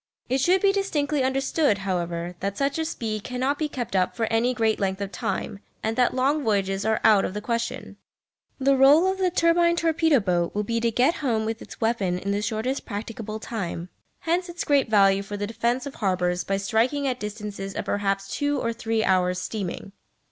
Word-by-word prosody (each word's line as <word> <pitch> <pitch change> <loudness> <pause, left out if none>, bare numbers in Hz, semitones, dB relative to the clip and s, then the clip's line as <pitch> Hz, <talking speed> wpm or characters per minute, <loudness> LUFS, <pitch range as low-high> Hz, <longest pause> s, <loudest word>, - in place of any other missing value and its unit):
It 260 +2 +1
should 365 +5 +3
be 395 - +6
distinctly 300 -8 0
understood, 270 -2 +1
however, 175 -3 -3
that 200 +1 -3
such 280 +2 0
a 320 - 0
speed 220 -9 -3
cannot 260 +3 -1
be 305 -1 -1
kept 245 -7 -4
up 185 -1 +1
for 230 - 0
any 235 +2 +3
great 225 -3 +1
length 190 -1 -1
of 200 -1 -4
time 200 0 -3 0.2
and 220 +1 -1
that 250 0 +2
long 280 +4 +1
voyages 195 -3 0
are 220 0 +2
out 210 -3 +6
of 185 - -3
the - - -1
question. 230 -1 -3 0.6
The 275 0 +3
rôle 290 +8 +6
of 380 - -5
the 370 -1 +2
turbine 340 0 +3
torpedo 325 -3 +3
boat 175 -4 0
will 210 - 0
be 230 +2 -1
to 230 0 +1
"get 250 +8 +2
home" 230 -6 0
with 225 0 -3
its - - -11
weapon 215 -6 0
in 200 +2 -3
the 200 +1 0
shortest 225 +5 -2
practicable 215 0 -6
time. 180 -6 -5 0.3
Hence 350 +2 0
its 345 0 -4
great 280 -4 +2
value 195 -2 +4
for 205 +1 -6
the 205 - -2
defence 235 +4 -1
of 280 - -6
harbours 180 -3 0
by 195 +1 -1
striking 235 +8 +1
at 255 -1 -1
distances 210 -2 -6
of - - -3
perhaps 195 -1 -1
two 290 -1 0
or 230 - -1
three 225 -1 -1
hours' 180 -2 +2
steaming. 195 -2 -5
225 Hz, 205 wpm, -25 LUFS, 200-275 Hz, 0.6 s, be